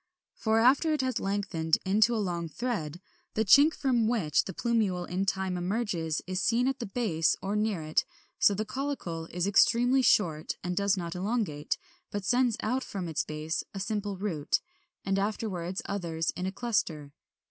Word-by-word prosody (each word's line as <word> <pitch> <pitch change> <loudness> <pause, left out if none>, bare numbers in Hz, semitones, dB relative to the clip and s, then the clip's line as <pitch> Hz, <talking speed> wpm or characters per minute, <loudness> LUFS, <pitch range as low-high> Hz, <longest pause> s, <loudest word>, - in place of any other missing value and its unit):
For 220 0 +1
after 270 +7 +4
it 300 - +1
has 255 -2 -1
lengthened 195 -5 0
into 215 +5 +3
a - - 0
long 170 -2 -3
thread, 175 - -3 0.4
the 220 - +1
chink 285 - +7
from 245 -5 +1
which 205 -11 +1
the - - -4
plumule 210 -7 0
in 190 +2 -2
time 190 -1 0
emerges 175 -5 -1
is 185 +1 -2
seen 235 +5 +2
at 270 -1 -1
the 235 - -4
base, 190 -7 +1
or 195 +2 -3
near 210 -5 0
it, 155 0 +1 0.4
so 200 - +5
the 215 +2 -2
caulicle 210 - -4
is 175 +1 -2
extremely 245 +6 +4
short, 160 -10 +2
and 180 0 -2
does 200 +1 +2
not 170 -2 -4
elongate, 185 -6 -1 0.3
but 205 -2 -4
sends 245 +1 +2
out 255 +4 0
from 190 -4 -5
its 160 -2 -1
base 155 +1 -3
a - - -3
simple 205 0 -2
root, 180 -7 0 0.5
and 195 0 +1
afterwards 195 -3 -2
others 170 -5 -2
in 180 +1 -3
a - - -2
cluster. 175 -10 -2
195 Hz, 175 wpm, -29 LUFS, 175-230 Hz, 0.5 s, chink